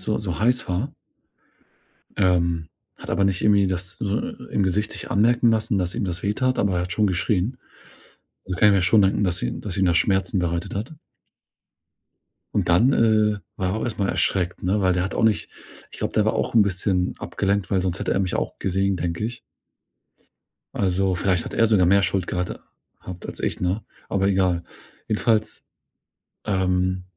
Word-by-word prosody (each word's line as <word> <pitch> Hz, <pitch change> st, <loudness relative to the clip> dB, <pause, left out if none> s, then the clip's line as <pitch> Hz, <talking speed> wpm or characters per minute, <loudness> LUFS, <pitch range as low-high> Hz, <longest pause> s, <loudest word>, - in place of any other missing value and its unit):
so 105 Hz, -, -1 dB
so 90 Hz, -6 st, -4 dB
heiß 125 Hz, +2 st, +1 dB
war 100 Hz, +11 st, -2 dB, 1.2 s
ähm, 85 Hz, -4 st, +1 dB, 0.3 s
hat -, -, -9 dB
aber 100 Hz, -, +2 dB
nicht 95 Hz, -1 st, 0 dB
irgendwie 100 Hz, -2 st, +4 dB
das 90 Hz, 0 st, -3 dB
so 100 Hz, 0 st, 0 dB, 0.3 s
im 100 Hz, -, +1 dB
Gesicht 100 Hz, +3 st, 0 dB
sich -, -, -8 dB
anmerken 120 Hz, +3 st, +3 dB
lassen, 110 Hz, 0 st, +1 dB
dass 90 Hz, -1 st, -2 dB
ihm -, -, -2 dB
das 90 Hz, -2 st, -4 dB
weh 100 Hz, -, +1 dB
tat, 130 Hz, +3 st, 0 dB
aber 100 Hz, -3 st, +1 dB
er 90 Hz, -, 0 dB
hat 90 Hz, 0 st, -4 dB
schon 105 Hz, +3 st, +2 dB
geschrien. 95 Hz, +6 st, 0 dB, 0.9 s
Also 90 Hz, -2 st, -3 dB
kann 105 Hz, -, +5 dB
ich 100 Hz, -, +5 dB
mir 95 Hz, -, +2 dB
schon 100 Hz, +3 st, +5 dB
denken, 95 Hz, +2 st, +2 dB
dass 90 Hz, -1 st, -1 dB
ihm -, -, -3 dB
dass 100 Hz, -2 st, -6 dB
ihm 95 Hz, -, +2 dB
das 85 Hz, -1 st, +3 dB
Schmerzen 95 Hz, -1 st, +1 dB
bereitet 85 Hz, 0 st, -2 dB
hat. 110 Hz, +10 st, -4 dB, 1.6 s
Und -, -, 0 dB
dann, 115 Hz, +11 st, +4 dB
äh, 110 Hz, -3 st, +3 dB, 0.2 s
war 95 Hz, -1 st, -1 dB
er 95 Hz, -, -2 dB
auch -, -, -2 dB
erst 120 Hz, -, -4 dB
mal 100 Hz, -1 st, 0 dB
erschreckt, 90 Hz, -2 st, 0 dB
ne, 100 Hz, +4 st, +1 dB
weil 95 Hz, -1 st, +3 dB
der 90 Hz, 0 st, 0 dB
hat 95 Hz, -, -3 dB
auch -, -, -1 dB
nicht 110 Hz, -2 st, +2 dB, 0.4 s
ich -, -, -12 dB
glaube, -, -, -2 dB
der -, -, +3 dB
war -, -, +1 dB
auch -, -, -2 dB
'n 110 Hz, -, +7 dB
bisschen 95 Hz, -1 st, 0 dB
abgelenkt, 100 Hz, -1 st, -1 dB
weil 95 Hz, -2 st, +2 dB
sonst 95 Hz, 0 st, -2 dB
hätte -, -, 0 dB
er -, -, +1 dB
mich 95 Hz, -2 st, -1 dB
auch -, -, -3 dB
gesehen, 95 Hz, 0 st, 0 dB
denke 85 Hz, +4 st, -3 dB
ich. 120 Hz, +1 st, -5 dB, 1.3 s
Also 95 Hz, 0 st, +1 dB
vielleicht 90 Hz, -1 st, 0 dB
hat -, -, -7 dB
er 115 Hz, -, +4 dB
sogar 100 Hz, -5 st, +3 dB
mehr 100 Hz, +2 st, +4 dB
Schuld 90 Hz, 0 st, 0 dB
gehat 90 Hz, 0 st, -3 dB, 0.4 s
habt 90 Hz, -1 st, -9 dB
als -, -, -7 dB
ich, -, -, -2 dB
ne? 90 Hz, +4 st, -1 dB, 0.2 s
Aber 95 Hz, 0 st, +1 dB
egal. 90 Hz, -3 st, +1 dB, 0.4 s
Jedenfalls, 110 Hz, 0 st, 0 dB, 0.8 s
ähm, 95 Hz, -1 st, 0 dB
95 Hz, 195 wpm, -23 LUFS, 90-105 Hz, 1.6 s, n